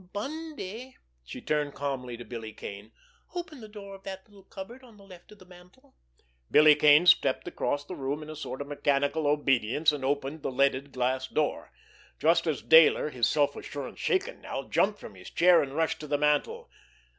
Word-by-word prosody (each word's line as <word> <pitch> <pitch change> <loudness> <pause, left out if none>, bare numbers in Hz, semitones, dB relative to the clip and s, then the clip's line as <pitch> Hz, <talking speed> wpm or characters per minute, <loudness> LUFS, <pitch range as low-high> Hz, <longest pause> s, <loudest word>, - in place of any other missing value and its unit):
"Bundy"—she 245 - -8
turned 150 -2 -1
calmly 130 -4 -4
to 120 - -10
Billy 115 -3 -7
Kane—"open 245 - -10
the 215 - -9
door 205 -2 -10
of 195 - -12
that 190 -1 -8
little 205 -2 -18
cupboard 220 +7 -10
on 230 -4 -17
the 200 - -17
left 185 -2 -15
of 210 - -14
the 185 - -17
mantel." 180 +10 -19 0.6
Billy 155 0 +7
Kane 150 +2 +5
stepped 140 -5 +4
across 145 -4 -2
the 185 - -7
room 145 -1 -4
in 150 - -11
a - - -8
sort 145 -3 -6
of 140 - -6
mechanical 145 +1 0
obedience, 145 0 +2
and 145 -3 -5
opened 140 +2 -2
the - - -2
leaded 140 +1 +1
glass 130 0 -1
door—just 155 +2 -2
as 155 -4 -2
Dayler, 160 -1 +6
his 125 -4 +1
self 145 -2 +1
assurance 140 -3 -7
shaken 390 +6 -1
now, - - -5
jumped - - +1
from - - -10
his - - -12
chair, 175 -1 +5
and 140 -1 -5
rushed 160 -1 0
to 150 - -8
the 145 0 0
mantel. 150 0 0
150 Hz, 180 wpm, -28 LUFS, 140-190 Hz, 0.6 s, Billy